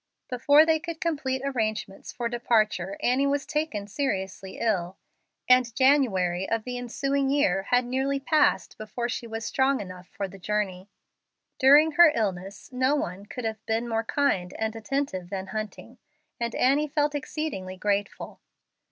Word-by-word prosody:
Before 285 +5 +5
they 320 -1 +3
could 335 -1 -6
complete 275 -6 -2
arrangements 215 -7 -3
for 240 -1 -3
departure, 215 -5 0
Annie 265 +3 +2
was 280 0 0
taken 300 -9 -2
seriously 195 -5 -3
ill, 190 -5 -1 0.5
and 250 -3 +4
January 195 -10 +2
of 225 -1 0
the 250 +1 -5
ensuing 275 +3 -1
year 270 -10 +2
had 245 0 +3
nearly 265 +3 -1
passed 300 +2 +1
before 235 +2 -4
she 235 0 -4
was 225 -1 -5
strong 265 +3 +1
enough 185 -2 -9
for 200 +1 -5
the 195 +1 -13
journey. 195 -1 -2 0.7
During 290 +4 +7
her 335 +1 +7
illness 195 -1 -3
no 260 +3 +2
one 195 -7 -4
could 250 +2 -6
have 220 -1 -4
been 225 +2 0
more 225 -1 -1
kind 215 -9 0
and 220 0 -2
attentive 225 -6 -3
than 190 -1 -4
Hunting, 215 +3 -6 0.4
and 235 -1 -2
Annie 280 +4 +3
felt 295 0 0
exceedingly 270 -10 -4
grateful. 205 +1 -2
235 Hz, 150 wpm, -26 LUFS, 200-275 Hz, 0.7 s, During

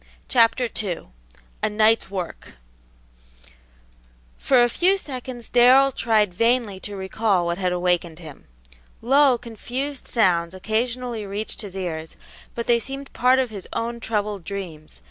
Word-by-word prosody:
Chapter 240 0 +3
II 180 - -5 0.5
A - - +1
NIGHT'S 215 0 +2
WORK 180 - -6 1.9
For 255 -3 +4
a - - +4
few 365 +10 +2
seconds 255 -7 -7
Darrell 255 +3 +6
tried 215 -6 +1
vainly 230 -1 +1
to 205 +1 -7
recall 190 -1 0
what 170 +1 -2
had 180 -1 0
awakened 175 -2 0
him. 160 -5 -12 0.6
Low, 270 +1 +5
confused 245 +4 -5
sounds 180 -6 +2
occasionally 230 +2 -2
reached 205 +4 -4
his 200 -3 -8
ears, 160 -4 -5 0.4
but 235 - -3
they 235 -1 +3
seemed 270 +3 -8
part 255 +1 +4
of 255 -3 0
his 200 -3 -8
own 235 +1 -3
troubled 210 -4 -2
dreams. 165 - -7
220 Hz, 135 wpm, -23 LUFS, 185-245 Hz, 1.9 s, Darrell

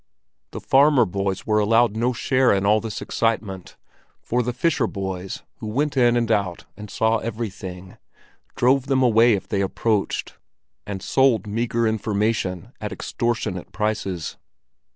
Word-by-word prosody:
The - - -7
farmer 140 -2 +4
boys 95 0 -3
were 105 -1 +2
allowed 115 +1 +3
no 120 +3 +1
share 130 +1 +2
in 100 0 0
all 105 +2 +4
this 115 -2 -5
excitement, 105 -5 -2 0.4
for 125 +1 -1
the 125 +1 -2
fisher 130 -1 +1
boys, 95 -2 -5
who - - -7
went 140 +7 -1
in 120 -2 +4
and 115 -1 0
out 95 -5 -1
and 105 +1 -10
saw 110 +2 +1
everything, 95 -5 -6 0.6
drove 130 +2 +2
them 130 -1 +2
away 115 -1 +5
if 100 - -2
they 100 -2 -1
approached—and 100 - -4
sold 130 -5 +3
meagre 115 +2 -1
information 105 -4 -1
at - - -4
extortionate 115 -6 -3
prices. 105 -6 -2
110 Hz, 140 wpm, -23 LUFS, 100-120 Hz, 0.6 s, away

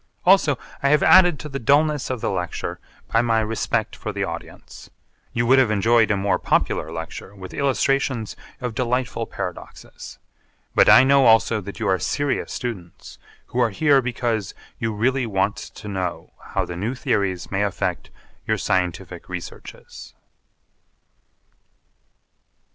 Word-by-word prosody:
Also 175 -7 +5 0.2
I 140 - +2
have 150 +1 +4
added 175 -4 +6
to 150 - -7
the 135 -2 -5
dullness 145 +2 +2
of 130 -3 -3
the - - -1
lecture 90 -1 -4 0.3
by 115 - +5
my 115 -2 +2
respect 110 0 -1
for - - -5
the - - -3
audience. - - -8 0.4
You 120 0 0
would 130 +3 +5
have 130 -4 +3
enjoyed 110 +2 +3
a 105 - +2
more 100 +1 0
popular 80 - 0
lecture 85 +4 -7
with 95 -2 -10
illustrations 135 -4 0 0.2
of 125 -3 -4
delightful 125 -1 -1
paradoxes. 90 -3 -8 0.6
But - - +5
I - - +9
know 135 -1 +5
also 115 -1 +4
that 100 +3 -9
you 110 - -1
are 95 -1 +2
serious 140 - -1
students 95 -9 -7 0.3
who 125 - -4
are 120 -2 +3
here 140 +5 +3
because 120 -4 -2 0.2
you 115 -1 -1
really 125 +4 0
want 100 0 0
to 105 0 -10
know 95 -3 -4
how - - -2
the 85 - -7
new 105 +9 -3
theories 100 -9 -1
may 100 0 0
affect 100 -2 -2 0.4
your - - +1
scientific 90 -2 -2
researches. - - -9
115 Hz, 150 wpm, -22 LUFS, 100-130 Hz, 0.6 s, I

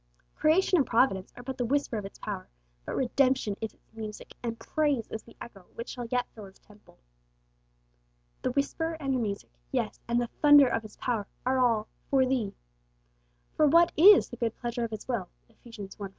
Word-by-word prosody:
Creation 360 +4 +3
and 275 - +2
Providence 225 -6 +2
are 245 - -9
but 265 +1 -6
the 245 - +1
whisper 280 0 0
of 210 -2 -3
its 195 - -10
power, 195 -3 -6 0.4
but - - -3
Redemption 260 -4 +1
is 220 - -4
its - - -36
music, 215 -2 -8
and 230 -1 -4
praise 280 0 0
is 220 - -4
the 230 - -18
echo 195 -6 -11
which 230 - -6
shall 245 -2 -5
yet 245 +1 0
fill 215 -2 -10
His 190 0 -15
temple. 210 0 -21 1.4
The - - 0
whisper 320 +5 -1
and 275 -3 -1
the 255 - +1
music, 205 - -4 0.2
yes, - - -2
and 235 0 +2
'the 240 - 0 0.2
thunder 290 -1 +8
of 225 -2 0
His 215 -1 -13
power,' 225 -5 -2 0.2
are 260 +1 +2
all 230 -4 +2 0.2
'for 265 -2 +4
thee.' 250 -6 -1 1.0
For 305 - +4
what 335 +3 +5
is 390 +6 +8
'the 240 - -8
good 230 -2 -1
pleasure 240 0 -3
of - - -5
His 215 -1 -7
will'? 230 -8 -2 0.2
(Eph. 230 - -29 0.2
i. 200 - -5
5.) 195 +1 -8
240 Hz, 200 wpm, -28 LUFS, 215-270 Hz, 1.4 s, thunder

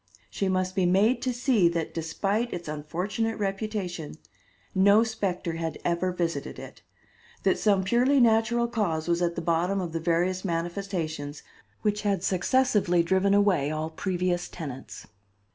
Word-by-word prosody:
She 195 - -1
must 185 0 0
be 185 -2 +2
made 205 +7 +3
to 255 - 0
see 240 -7 +3
that, 170 -1 -3
despite 195 +8 -1
its 175 -2 -5
unfortunate 180 +9 -2
reputation, 195 -6 -3 0.6
no 200 +3 +5
specter 190 -7 -2
had 165 -1 -3
ever 175 +2 +1
visited 170 -5 -3
it; - - -10 0.6
that - - +2
some 200 -3 +3
purely 250 +7 +3
natural 235 0 +3
cause 175 -9 -1
was 170 0 +1
at 170 -1 0
the 170 - -4
bottom 175 +4 +1
of 175 -3 -3
the 165 - -1
various 175 +3 0
manifestations 165 -4 -3 0.4
which 210 -1 0
had 200 -3 0
successively 190 -3 +2
driven 190 +3 +2
away 190 -9 +3
all 155 +1 -3
previous 180 0 -1
tenants. 140 -6 -8
185 Hz, 145 wpm, -27 LUFS, 170-210 Hz, 0.6 s, no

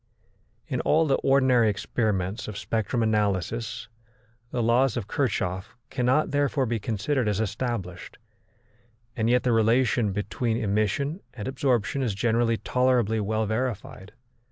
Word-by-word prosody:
In - - -2
all 160 +1 +3
the 135 -3 +2
ordinary 130 -4 +3
experiments 100 -1 -2
of 105 -2 -6
spectrum 115 +3 -1
analysis 110 +1 -1 0.6
the 120 - -1
laws 120 +2 +3
of 110 -4 -4
Kirchhoff 95 -9 -2
cannot 130 +4 +1
therefore 145 -1 +1
be 115 -1 -1
considered 115 +4 -1
as 105 -1 -1
established, 110 -3 -4 1.0
and 110 0 0
yet 125 +1 +3
the 125 - +2
relation 115 -1 +2
between 110 +3 -2
emission 110 - 0 0.2
and 105 -2 -5
absorption 130 -1 0
is 115 -7 -1
generally 115 +1 +1
tolerably 125 -4 +1
well 110 +1 0
verified. 110 -3 -3
115 Hz, 130 wpm, -26 LUFS, 105-125 Hz, 1.0 s, all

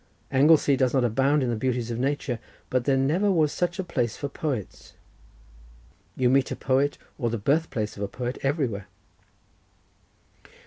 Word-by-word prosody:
Anglesey 145 +1 +5
does 130 0 +1
not 130 - +3
abound 135 +5 +2
in 120 - 0
the - - 0
beauties 120 0 -1
of 115 - -3
nature, 135 -2 -1 0.3
but 125 -1 +1
there 135 -1 +3
never 160 +10 +2
was 155 -5 +2
such 175 -1 -1
a 190 - -2
place 125 -10 -2
for 140 - -4
poets; 135 - -5 1.2
you 130 - +2
meet 135 +1 +3
a - - -3
poet, 135 +2 +1 0.2
or 120 -3 0
the 115 - -2
birth 145 +10 +1
place 110 -6 -3
of - - -7
a 100 - -1
poet, 125 +3 -5
everywhere." 135 - -1
135 Hz, 170 wpm, -26 LUFS, 120-145 Hz, 1.2 s, Anglesey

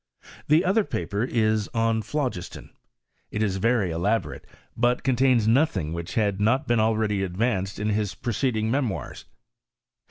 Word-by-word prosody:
| - - -19
Theother 185 +7 +3
paper 100 +6 -2
is" 110 -4 0
OnPhlogislon;"itisvery 110 - -2
elabo 100 +8 0
rate, - - -10 0.3
but 120 +1 +1
contains 125 -3 +3
nothing 110 - +2
which 85 +1 -6
had 105 -3 0
not 130 +7 +2
been 120 -1 +2
al 110 0 +2
ready 105 -3 0
advanced 95 +1 -1
in 105 +1 -1
his 105 -2 -1
preceding 115 -2 -1
memoirs. 130 -6 -3
110 Hz, 125 wpm, -25 LUFS, 100-125 Hz, 0.3 s, Theother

